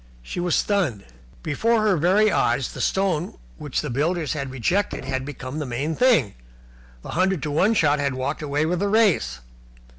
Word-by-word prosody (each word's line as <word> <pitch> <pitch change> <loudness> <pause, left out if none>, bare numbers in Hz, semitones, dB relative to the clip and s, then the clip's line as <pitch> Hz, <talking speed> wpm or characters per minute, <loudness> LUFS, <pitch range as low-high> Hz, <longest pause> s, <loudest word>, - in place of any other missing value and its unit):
She 120 - -6
was 175 -1 +1
stunned. 175 - 0 0.4
Before 220 +9 +1
her 210 -3 +3
very 190 +6 +3
eyes 120 +2 +1
the - - -6
stone 185 -4 0 0.2
which 145 -3 -3
the 150 - -4
builders 155 +3 0
had 140 -3 -4
rejected 135 - -1
had 130 -1 -3
become 135 0 -6
the 150 - -3
main 135 +6 -2
thing, 230 - +3 0.7
the - - -9
hundred 185 -1 0
to 150 - -2
one 195 +9 +2
shot 150 -5 +3
had 140 -2 -1
walked 130 +4 -3
away 150 +1 0
with 175 +2 -1
the 200 +1 0
race. 200 - +2
155 Hz, 180 wpm, -23 LUFS, 135-190 Hz, 0.7 s, her